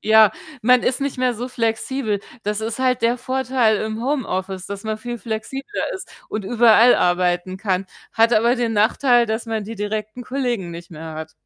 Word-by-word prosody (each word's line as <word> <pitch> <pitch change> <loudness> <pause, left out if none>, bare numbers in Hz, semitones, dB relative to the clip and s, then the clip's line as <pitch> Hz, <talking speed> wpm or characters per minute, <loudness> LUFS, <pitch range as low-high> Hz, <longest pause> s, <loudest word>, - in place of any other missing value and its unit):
Ja, 220 -2 +6 0.3
man 250 +1 +5
ist 255 +2 0
nicht 275 -2 -2
mehr 250 -1 +1
so 245 +3 -5
flexibel. 225 -2 -1 0.2
Das 210 +1 -1
ist 225 +2 -3
halt 255 -1 +1
der 235 +2 +2
Vorteil 255 -4 +1
im 220 0 -3
Homeoffice, 195 -8 -2
dass 200 +1 -7
man 215 0 -2
viel 240 +1 -6
flexibler 240 - -4
ist 380 - -7 0.2
und 215 -2 -4
überall 235 +2 +6
arbeiten 180 +1 +1
kann, 195 -1 -1 0.3
hat 230 +1 +3
aber 235 +3 +4
den 240 -2 -1
Nachteil, 240 +3 +3
dass 220 +2 -2
man 220 -2 -2
die 225 +3 -6
direkten 215 +3 -4
Kollegen 245 -9 -2
nicht 170 0 -9
mehr 160 0 -8
hat. 160 0 -7
225 Hz, 185 wpm, -21 LUFS, 205-245 Hz, 0.3 s, Ja